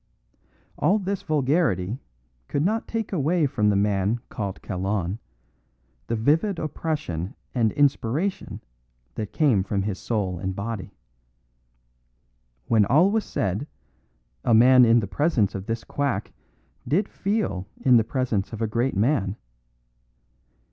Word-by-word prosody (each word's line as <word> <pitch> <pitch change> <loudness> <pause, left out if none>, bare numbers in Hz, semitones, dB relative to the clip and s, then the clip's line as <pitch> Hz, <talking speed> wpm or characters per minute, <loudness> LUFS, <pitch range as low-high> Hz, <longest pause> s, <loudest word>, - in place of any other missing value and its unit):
All 200 - +3
this 195 -1 -3
vulgarity 135 - +1 0.5
could 140 - -1
not 220 +4 0
take 225 -3 -3
away 165 0 +2
from 105 -6 +1
the 100 - +2
man 100 +2 +1
called 100 -4 -5
Kalon 95 +1 -2 0.9
the 115 - -1
vivid 160 - +2
oppression 150 - -3 0.2
and 115 -4 +2
inspiration 145 - 0 0.5
that 105 - -5
came 135 -11 +3
from 100 0 -1
his 100 -2 -3
soul 95 -6 -2
and 95 +1 -3
body. 105 -1 -5 1.7
When 110 - +4
all 165 - +4
was 220 0 0
said, 100 +8 -2 0.8
a 115 - +4
man 125 +2 +7
in 115 0 +5
the 100 - -4
presence 130 - +1
of 95 0 -6
this 115 0 -3
quack 140 -8 -2 0.5
did 175 - +1
feel 195 - -2
in 125 -2 +6
the 115 - +4
presence 115 -5 -1
of 110 - -6
a - - +2
great 115 +1 -1
man. 105 -4 +1
115 Hz, 130 wpm, -25 LUFS, 100-150 Hz, 1.7 s, man